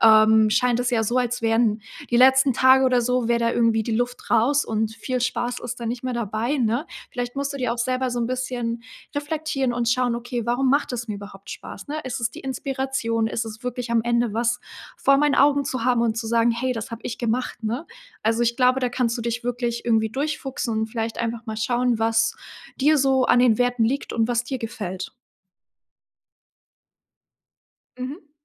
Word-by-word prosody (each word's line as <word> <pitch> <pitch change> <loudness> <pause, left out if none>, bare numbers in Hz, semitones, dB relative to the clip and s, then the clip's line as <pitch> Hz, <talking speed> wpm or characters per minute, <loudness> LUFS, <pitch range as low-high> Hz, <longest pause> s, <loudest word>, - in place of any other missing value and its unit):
ähm 220 0 +6
scheint 245 +2 +2
es 245 - 0
ja 225 -2 +2
so, 240 +4 +1
als 245 -1 -1
wären 225 -2 +2 0.3
die 240 - +1
letzten 265 +1 +6
Tage 260 +1 +6
oder 250 -1 +3
so, 250 -1 0
wäre 235 0 +2
da 230 - +2
irgendwie 230 -2 +2
die 220 0 -1
Luft 245 +1 -3
raus 260 +6 +3
und 220 0 -1
viel 250 +3 -3
Spaß 245 0 -1
ist 240 0 -5
da 235 - -4
nicht 240 +2 -4
mehr 255 - -1
dabei, 235 +4 -1
ne? 240 +6 0 0.2
Vielleicht 245 -1 -4
musst 280 0 -2
du - - -5
dir 250 -3 -1
auch 235 - -6
selber 255 +1 0
so 240 0 -2
'n 230 - 0
bisschen 245 -2 -3 0.3
reflektieren 290 -3 -1
und 240 -1 -1
schauen: 245 0 +2
„Okay, 240 0 -3
warum 255 +2 +2
macht 285 -2 +1
das 235 -1 -4
mir 210 - -2
überhaupt 200 -1 -10
Spaß, 195 - -9
ne? 300 - -3
Ist 255 -1 -4
es 230 0 0
die - - -10
Inspiration? 265 -4 -2
Ist 230 +1 -2
es 220 +2 -9
wirklich 245 -1 -4
am 230 -1 +2
Ende 235 -2 +1
was 235 +1 0 0.4
vor 275 0 +4
meinen 295 0 +3
Augen 285 0 +4
zu 255 -3 -3
haben 245 -2 +3
und 225 -1 0
zu 225 0 -3
sagen: 230 0 +3
‚Hey, 255 +2 -1
das 225 -1 -5
habe 230 - -6
ich - - -5
gemacht’”, 240 0 -2
ne? 240 +9 -2 0.4
Also, 225 +2 +1
ich 235 0 +1
glaube, 255 0 +4
da 250 -1 0
kannst 245 -1 0
du - - -3
dich 235 +1 -2
wirklich 240 -1 -2
irgendwie 220 -2 +2
durch 295 +5 -2
fuchsen 265 -3 -4
und 220 - 0
vielleicht 225 0 -4
einfach 235 0 -3
mal 220 0 -4
schauen, 240 +1 +1
was 225 0 +2 0.4
dir 300 +2 +4
so 265 -1 +3
an 245 - +4
den 240 -3 +4
Werten 245 -2 +2
liegt 275 +5 -1
und 225 0 +1
was 240 0 0
dir 260 +1 -4
gefällt. 190 -5 -5 2.9
Mhm. 290 +4 -7
240 Hz, 210 wpm, -23 LUFS, 230-255 Hz, 2.9 s, ähm